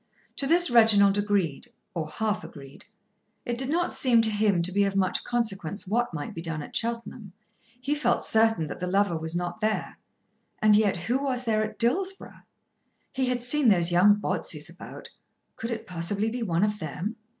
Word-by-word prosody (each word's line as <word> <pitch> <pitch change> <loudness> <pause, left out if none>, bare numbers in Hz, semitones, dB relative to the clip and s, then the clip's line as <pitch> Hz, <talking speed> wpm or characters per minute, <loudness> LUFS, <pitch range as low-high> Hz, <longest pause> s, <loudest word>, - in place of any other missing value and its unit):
To 275 - +1
this 340 -1 +4
Reginald 205 -4 +5
agreed, 205 - -1 0.2
or 165 -4 -3
half 210 +5 -2
agreed. 140 -1 -12 0.6
It 240 - -2
did 260 +2 -2
not 345 +3 0
seem 235 -3 +3
to 220 - +1
him 205 -4 +1
to 180 - 0
be 200 +2 +2
of 195 0 -1
much 190 -2 +1
consequence 205 -5 -2
what 235 +5 0
might 150 -4 -6
be 165 - -6
done 160 -3 -4
at - - -11
Cheltenham. 230 -4 -3 0.5
He 275 +4 -1
felt 240 -5 0
certain 225 -6 +2
that - - -7
the 180 - -3
lover 195 -1 +1
was 160 +1 -4
not 175 +4 -3
there. 215 0 -2 0.6
And 215 -1 +4
yet 205 -3 +2
who 255 +4 0
was 260 -3 -2
there 215 -1 +1
at 215 - -6
Dillsborough? 375 +12 -1 0.7
He 265 -1 0
had 250 -1 -1
seen 270 +2 +1
those 175 -3 +3
young 190 +4 +6
Botseys 210 - -3
about. - - -11 0.4
Could 230 - -5
it 225 -2 -4
possibly 195 +5 -2
be 245 +1 -4
one 175 -4 0
of 210 0 0
them? 170 +8 -5
210 Hz, 185 wpm, -26 LUFS, 180-240 Hz, 0.7 s, young